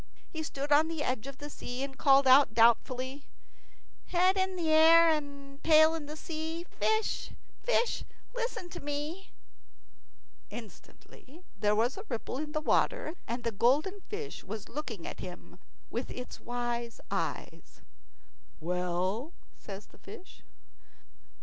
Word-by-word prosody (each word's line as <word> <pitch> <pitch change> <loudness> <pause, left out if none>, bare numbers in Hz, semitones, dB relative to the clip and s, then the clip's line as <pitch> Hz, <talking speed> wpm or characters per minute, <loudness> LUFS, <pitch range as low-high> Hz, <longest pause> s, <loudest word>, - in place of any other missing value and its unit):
He 320 - -4
stood 290 -2 -4
on 300 +2 +6
the 320 -2 -3
edge 255 -2 -2
of 275 -1 -8
the 290 - -7
sea 255 -3 -5
and 275 -1 -5
called 275 0 +5
out, 260 -2 +6
doubtfully, 255 +4 +3 0.8
"Head 370 +2 +3
in 375 -1 0
air 325 0 +7
and 280 -2 -4
tail 315 0 +7
in 315 -3 -5
sea, 320 +1 -4
Fish, 435 +4 0 0.3
fish, - - +1 0.3
listen 475 -7 -3
to - - -7
me." 295 +6 -4 1.2
Instantly 255 - -12
there 210 0 +2
was 235 - +1
a 400 - -7
ripple 250 +1 -3
in 300 0 -5
the 305 - 0
water, 315 +1 +1
and 240 +2 -3
the 230 - 0
golden 295 - +2
fish 430 0 -5
was 210 +1 -7
looking 240 - -5
at - - -6
him 180 0 -9 0.3
with 240 +3 -3
its 250 0 -7
wise 240 -1 -3
eyes. - - -4 0.8
"Well?" 180 - -1 0.2
says 200 0 -9
the - - -21
fish. 370 - -12
285 Hz, 135 wpm, -31 LUFS, 235-325 Hz, 1.2 s, air